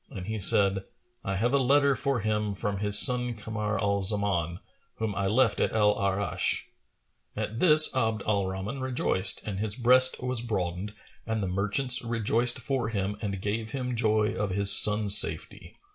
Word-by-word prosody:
and 95 -3 -9
he 110 +1 -5
said, 100 0 +2 0.4
"I 95 - -4
have 120 +7 -2
a 140 - +2
letter 140 +1 +2
for 140 -4 -2
him 105 0 -3
from 100 0 -5
his 105 0 +3
son 125 0 +2
Kamar 105 0 -5
al 100 -2 -1
Zaman, 95 -4 -2 0.4
whom 110 -2 -4
I 100 0 -3
left 110 0 0
at - - -1
Al 105 -1 +2
Arнsh."[FN#437] 100 -3 -2 0.7
At 115 +2 -5
this 155 -5 +7
Abd 110 -4 -2
al 100 -3 -1
Rahman 95 +8 -6
rejoiced 120 -7 -2
and 100 -3 -6
his 105 -1 +2
breast 130 +1 +3
was 125 -2 -4
broadened 100 -2 -5 0.3
and 110 -2 -3
the - - -3
merchants 105 +8 +1
rejoiced 115 +1 -1
for 130 -2 -4
him 100 -2 -4
and 100 -3 -5
gave 110 +2 -4
him 125 -2 -4
joy 110 -2 0
of 105 - -4
his 100 +1 +5
son's 105 -1 +5
safety. - - -1
105 Hz, 175 wpm, -26 LUFS, 100-120 Hz, 0.7 s, this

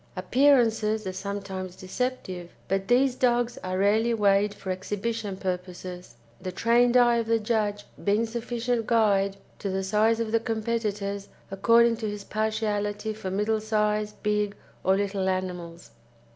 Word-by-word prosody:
Appearances 220 0 +3
are 185 - -3
sometimes 190 -2 -5
deceptive, 185 -4 -4 0.2
but 195 0 -1
these 255 +2 +4
dogs 245 -1 +1
are 185 0 -2
rarely 220 +4 +3
weighed 205 -1 +3
for 195 -2 -6
exhibition 205 +2 -3
purposes, 180 -3 -5 0.3
the 185 0 -4
trained 240 +5 +3
eye 240 -1 +5
of 230 -1 -1
the 230 0 +3
judge 210 -2 -1 0.2
being 210 +3 +2
sufficient 235 0 -2
guide 200 -4 +3 0.2
to 200 - -3
the 190 0 -1
size 215 +4 +2
of 225 -1 -2
the 230 - +3
competitors 215 -3 -2 0.2
according 230 +4 +4
to 220 -2 -3
his 205 -1 -6
partiality 215 0 -1
for 210 -3 -5
middle 210 +3 0
size, 210 -1 0
big, 210 -1 0 0.3
or 190 - +4
little 195 -1 0
animals. 180 -2 -4
210 Hz, 145 wpm, -26 LUFS, 195-230 Hz, 0.3 s, eye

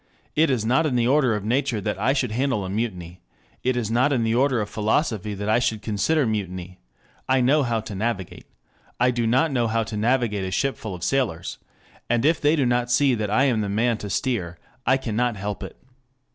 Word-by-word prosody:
it 160 0 +4
is 120 -5 0
not 135 +7 +3
in 130 - -1
the 120 -1 +2
order 130 -4 +3
of 105 -1 -4
nature 120 -1 0
that 95 - -3
I 120 +6 +2
should 130 -4 0
handle 125 -4 0
a 95 - -5
mutiny... 90 -5 -4 0.4
it 125 0 0
is 115 -3 -2
not 125 +5 +3
in 125 -4 +1
the 115 0 +1
order 130 0 +2
of 105 - -2
philosophy 110 - -1
that 100 +1 -5
I 110 +2 +3
should 110 -3 -1
consider 120 +9 +1
mutiny... 95 -4 -4 0.5
I 130 0 +4
know 135 +5 +3
how 120 -4 0
to 105 - -8
navigate... 100 -2 -4 0.5
I 125 +1 +4
do 120 -2 -1
not 130 +7 +2
know 120 -3 +1
how 115 0 0
to 110 - -6
navigate 110 -2 +1
a - - -3
ship 135 +9 0
full 105 -4 -6
of 90 - -9
sailors... 110 -11 -1 0.5
and 120 +2 +1
if 160 +1 +3
they 150 +2 +4
do 140 -4 +1
not 120 0 +1
see 135 +2 +3
that 110 -3 -2
I 110 +6 +3
am 125 -6 +2
the 100 - -2
man 115 +2 +1
to 100 - -6
steer, 95 -10 -2 0.3
I 130 - +5
cannot 120 -2 -1
help 100 0 -4
it. - - -8
115 Hz, 225 wpm, -24 LUFS, 105-130 Hz, 0.5 s, I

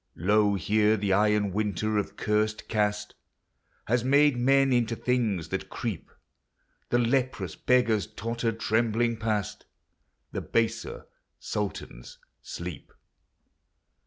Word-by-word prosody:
Lo 100 +3 +2
here 105 +2 +2
the 100 -1 0
iron 105 0 +2
winter 105 +1 0
of 100 - -5
curst 110 0 0
caste 105 -1 -1 0.7
Has 120 +1 +1
made 140 +2 +4
men 135 +2 +3
into 120 -1 +1
things 110 -10 -1
that - - -4
creep; - - -5 0.8
The 120 - +2
leprous 120 - 0
beggars 115 -5 +2
totter 115 +1 -2
trembling 115 +1 0
past; 110 -3 -3 0.6
The - - -3
baser 115 0 -1 0.3
sultans 95 -12 -5 0.2
sleep. 85 -3 -7
110 Hz, 105 wpm, -27 LUFS, 105-120 Hz, 0.8 s, made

